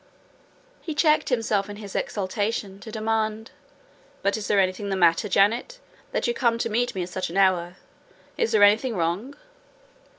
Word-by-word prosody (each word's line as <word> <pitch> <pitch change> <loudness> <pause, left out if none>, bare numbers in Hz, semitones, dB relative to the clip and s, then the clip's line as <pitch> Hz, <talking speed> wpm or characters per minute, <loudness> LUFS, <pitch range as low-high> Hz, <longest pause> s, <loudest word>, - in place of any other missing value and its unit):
He 315 -3 -5
checked 305 0 +3
himself 220 -5 0
in 205 - -6
his 205 -2 -9
exultation 200 0 -2
to 220 - -10
demand, 220 0 -2 0.7
"But 200 - +1
is 215 -2 -4
there 205 - +3
anything 190 +2 0
the 195 - 0
matter, 175 +3 +3
Janet, 225 - +2 0.3
that - - -1
you 240 - +1
come 235 -1 +1
to 230 - -2
meet 240 +1 0
me 185 - -1
at 175 - -7
such 185 -1 -3
an 175 - -5
hour? 185 -2 +2 0.6
Is 460 - 0
there 205 - +4
anything 220 +4 +4
wrong?" 185 +11 -2
210 Hz, 170 wpm, -24 LUFS, 190-230 Hz, 0.7 s, there